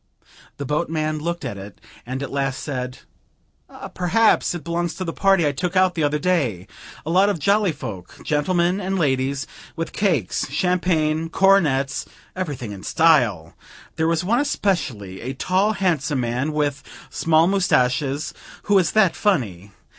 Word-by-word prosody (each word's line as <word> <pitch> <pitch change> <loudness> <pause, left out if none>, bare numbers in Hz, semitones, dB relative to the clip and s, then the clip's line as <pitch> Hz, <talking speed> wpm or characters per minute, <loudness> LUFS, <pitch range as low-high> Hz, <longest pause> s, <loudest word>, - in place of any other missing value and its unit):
The 140 - -5
boatman 155 +1 -1
looked 170 +3 -3
at 100 - -5
it, 95 -1 -11 0.3
and 130 +2 -4
at 140 - -6
last 135 -1 -2
said 125 -3 -4 1.0
"Perhaps 200 +1 +2
it 170 - -6
belongs 170 +1 -2
to 185 - -4
the 165 -2 -4
party 195 -4 +3
I 145 - +2
took 180 +6 -3
out 185 -1 +4
the 165 - -2
other 150 0 +1
day. 140 - 0 0.4
A 160 - -2
lot 190 +3 +4
of 200 - 0
jolly 200 +4 +2
folk, 110 - -8
gentlemen 175 +5 +1
and 190 +1 -2
ladies, 135 -2 0 0.3
with 165 -1 -4
cakes, 160 - 0
champagne, 165 -1 0
cornets 160 -8 +2 0.3
everything 145 - -4
in 100 -2 -8
style! 120 - +2 0.4
There 160 0 +1
was 165 +1 +1
one 230 +7 +2
especially, 150 - -2
a 130 +3 -4
tall 190 +8 +1
handsome 160 -9 0
man 125 +5 -1
with 145 -2 -1 0.3
small 160 0 +3
moustaches, 150 -5 +1 0.3
who 205 - 0
was 190 -3 +3
that 215 -5 +4
funny! 105 - -1
155 Hz, 155 wpm, -22 LUFS, 135-180 Hz, 1.0 s, out